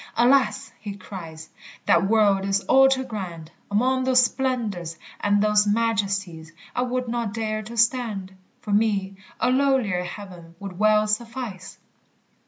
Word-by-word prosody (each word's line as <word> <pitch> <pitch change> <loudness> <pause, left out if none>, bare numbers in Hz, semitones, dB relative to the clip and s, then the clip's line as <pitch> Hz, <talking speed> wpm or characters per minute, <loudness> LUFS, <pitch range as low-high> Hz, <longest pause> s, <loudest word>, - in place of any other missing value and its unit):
"Alas!" 255 +3 +3
he 205 -2 -6
cries, 165 -5 -9 0.4
"That 170 +3 +4
world 205 -3 +3
is 195 0 +1
all 270 +4 +5
too 265 -1 +1
grand; 180 -9 -7 0.2
Among 255 +5 +1
those 255 -1 +5
splendors 225 - -2 0.2
and 205 0 +2
those 210 0 +3
majesties 200 -7 -1 0.2
I - - +1
would 250 0 -2
not 230 -3 -3
dare 215 -1 -2
to 230 +2 -9
stand; 225 -5 0 0.3
For 210 - -6
me 200 -2 +1 0.2
a 250 - +2
lowlier 255 -9 +2
heaven 175 -3 -10
would 195 -2 -8
well 215 0 +4
suffice!" 215 -4 -4
210 Hz, 140 wpm, -24 LUFS, 195-240 Hz, 0.4 s, all